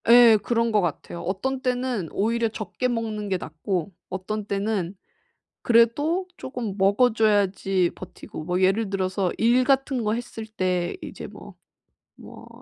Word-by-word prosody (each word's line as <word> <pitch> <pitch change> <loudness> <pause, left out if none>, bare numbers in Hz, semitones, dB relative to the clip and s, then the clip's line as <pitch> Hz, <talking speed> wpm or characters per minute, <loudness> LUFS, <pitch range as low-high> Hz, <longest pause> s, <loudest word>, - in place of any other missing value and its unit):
예 235 -1 +9
그런 230 0 +1
것 210 -1 +3
같아요. 170 0 -4
어떤 255 +9 -2
때는 250 - -1
오히려 230 +3 +1
적게 220 +3 -3
먹는 220 -4 -3
게 190 - +1
낫고 175 +3 -3 0.2
어떤 200 +3 -4
때는 200 -2 -2 0.7
그래도 290 +10 +3
쪼금 245 -7 -5
먹어 200 +6 +4
줘야지 195 -4 +2
버티고. 180 -3 -9
뭐 180 +2 0
예를 195 +3 +2
들어서 190 -1 -1
일 240 +3 +4
같은 270 -2 +1
거 210 - +1
했을 230 -1 -5
때 185 -5 -1
이제 - - -7
뭐, - - -12 0.6
뭐, - - -13
215 Hz, 260 characters per minute, -25 LUFS, 190-235 Hz, 0.7 s, 예